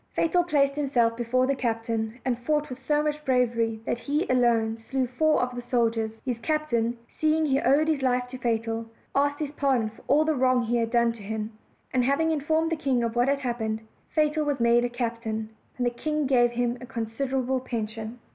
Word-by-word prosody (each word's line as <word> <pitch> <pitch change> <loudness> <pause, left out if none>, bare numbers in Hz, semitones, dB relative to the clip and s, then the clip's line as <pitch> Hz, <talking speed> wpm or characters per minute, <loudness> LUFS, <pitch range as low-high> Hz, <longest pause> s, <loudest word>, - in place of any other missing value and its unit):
Fatal 350 +2 +2
placed 280 -5 +2
himself 260 -5 +1
before 245 +2 +1
the 275 - +1
captain, 230 -2 -2
and 245 -2 0
fought 295 +3 -1
with 255 - -6
so 295 0 +3
much 300 0 -2
bravery 235 -4 +1
that 235 - -1
he 295 +7 -1
alone 230 -3 +2
slew 265 -1 +1
four 305 +6 +2
of 250 0 -3
the 245 - -4
soldiers. 230 -2 +1 0.2
His 245 -3 -2
captain, 240 -4 0
seeing 315 0 +1
he 275 -2 +2
owed 285 +5 +3
his 310 -3 +1
life 250 -1 +1
to 255 0 -8
Fatal, 225 -1 -1 0.3
asked 285 +1 +2
his 295 -2 -3
pardon 265 -7 +1
for 225 - -18
all 300 +2 +4
the 315 - +2
wrong 255 -2 +3
he 235 +1 0
had 230 -1 0
done 235 0 +3
him; 220 0 -5 0.4
and 255 -1 +3
having 280 +5 +2
informed 315 +2 +1
the - - +2
king 265 -5 +1
of 230 0 -2
what 240 +2 +3
had 280 0 +1
hap 240 -2 -2
pened, 220 0 -2 0.3
Fatal 305 0 +1
was 290 -2 -1
made 235 0 +4
a 245 - 0
captain, 230 -2 -3 0.3
and 250 - 0
the 240 - +2
king 305 +4 -2
gave 245 -3 +4
him 240 0 -1
a 250 - -8
considerable 255 +3 -2
pension. 225 -2 -5
250 Hz, 205 wpm, -26 LUFS, 230-285 Hz, 0.4 s, all